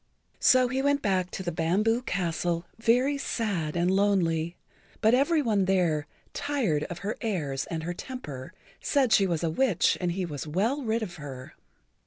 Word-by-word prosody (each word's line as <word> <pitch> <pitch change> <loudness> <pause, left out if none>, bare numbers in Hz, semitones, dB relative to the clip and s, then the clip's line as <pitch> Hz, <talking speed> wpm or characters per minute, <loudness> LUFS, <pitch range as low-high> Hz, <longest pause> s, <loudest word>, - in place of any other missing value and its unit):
So 255 -1 +5
he 260 +2 -1
went 285 0 +1
back 185 -3 +1
to 190 - -6
the 175 - -2
Bamboo 200 +9 +1
Castle 175 -4 -1
very 250 +5 +2
sad 195 - -2
and 175 +1 +2
lonely, 180 -4 +1 0.4
but 220 +1 +4
every 295 +4 +3
one 210 -5 +2
there, 170 -6 +1 0.3
tired 240 - 0
of 175 - -6
her 210 - -2
airs 155 - -2
and 160 -1 -4
her 175 +2 -3
temper, 155 - -7 0.3
said 270 -5 +2
she 195 - +5
was 170 -2 -1
a 165 - +1
witch 220 0 +2
and 175 -1 0
he 185 0 -2
was 150 -3 -6
well 215 - 0
rid 225 -2 -1
of 180 -5 -7
her. 135 -4 -8
190 Hz, 175 wpm, -27 LUFS, 165-235 Hz, 0.4 s, So